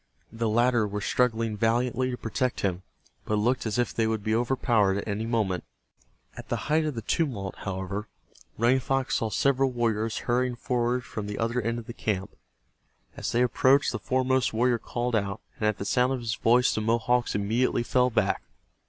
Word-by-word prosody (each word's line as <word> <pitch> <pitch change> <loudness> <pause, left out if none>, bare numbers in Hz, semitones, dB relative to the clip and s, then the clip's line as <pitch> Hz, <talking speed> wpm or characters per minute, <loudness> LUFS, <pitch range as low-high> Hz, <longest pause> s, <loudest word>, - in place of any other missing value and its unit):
The 115 0 -1
latter 120 0 +3
were 105 0 -3
struggling 115 0 0
valiantly 120 +4 +1
to 125 - -3
protect 125 +3 -2
him, 95 -2 -1 0.4
but 110 - -1
it 105 +1 0
looked 125 -1 +1
as 110 - -2
if 120 -1 0
they 115 -1 +1
would 110 -2 -1
be 110 0 0
overpowered 115 -4 +2
at 100 - -4
any 105 +2 -2
moment. 105 -6 0 0.7
At - - -10
the - - 0 0.2
height 155 +1 +3
of 150 -4 -2
the 115 - -5
tumult, 110 - -1
however, 95 +2 -4 0.5
Running 120 +4 +3
Fox 135 0 0
saw 115 - -1
several 135 +3 +2
warriors 115 -3 -1
hurrying 125 +1 0
forward 125 0 -1
from 105 -3 -6
the 105 - -4
other 115 +2 0
end 115 +1 -1
of 120 - -7
the 120 - -7
camp. 100 -3 -3 0.8
As - - -3
they 120 +1 +3
approached, 130 +3 +3
the 120 - -3
foremost 130 +2 +1
warrior 120 +1 +2
called 120 +1 -2
out, 100 -2 -1 0.2
and 110 - +1
at 105 - 0
the 100 - -5
sound 125 +5 +2
of 130 - -2
his 115 -2 -2
voice 120 +3 +3
the 110 - -1
Mohawks 120 +2 +1
immediately 115 +4 +1
fell 125 +1 +2
back. 115 - +1
115 Hz, 195 wpm, -27 LUFS, 105-125 Hz, 0.8 s, latter